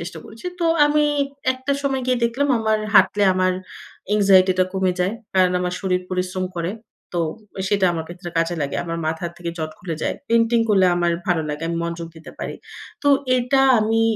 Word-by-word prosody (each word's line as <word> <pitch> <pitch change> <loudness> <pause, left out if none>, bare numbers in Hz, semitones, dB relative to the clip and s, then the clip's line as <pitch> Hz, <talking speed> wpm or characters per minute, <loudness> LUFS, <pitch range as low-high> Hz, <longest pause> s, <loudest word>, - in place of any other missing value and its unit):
চেষ্টা 170 +3 -7
করেছি। 225 +10 -10
তো - - +1 0.2
আমি 300 0 +3 0.5
একটা 260 +2 -3
সময় 270 -2 -1
গিয়ে 250 -1 +2
দেখলাম 265 +5 0
আমার 220 -1 +1 0.2
হাঁটলে 195 +2 +5
আমার 185 0 +2 0.6
anxiety 195 -2 +5
টা 185 - +5
কমে 190 -1 +1
যায়। 185 +3 +1 0.2
কারণ 185 -1 +4
আমার 180 0 -2
শরীর 185 -2 0
পরিশ্রম 185 0 -2
করে। 170 +2 -1 0.5
তো 170 - +2 0.5
সেটা 200 -2 +2
আমার 165 -1 -3
ক্ষেত্রে 175 0 -8
কাজে 165 +1 +1
লাগে। 140 - -2
আমার 165 0 -4
মাথা 160 +2 -2
থেকে 170 -1 -5
জট 155 0 -3
খুলে 170 -3 -4
যায়। - - 0
পেইন্টিং 230 0 +3
করলে 190 -3 +4
আমার 175 -1 +1
ভালো 175 -3 +1
লাগে। 150 +2 -4
আমি 170 - -2
মনযোগ 170 0 -4
দিতে 160 - -11
পারি। - - -4 0.5
তো 285 - +2 0.3
এটা 260 +2 +2 0.2
আমি 220 +1 +1
185 Hz, 185 wpm, -21 LUFS, 175-225 Hz, 0.6 s, হাঁটলে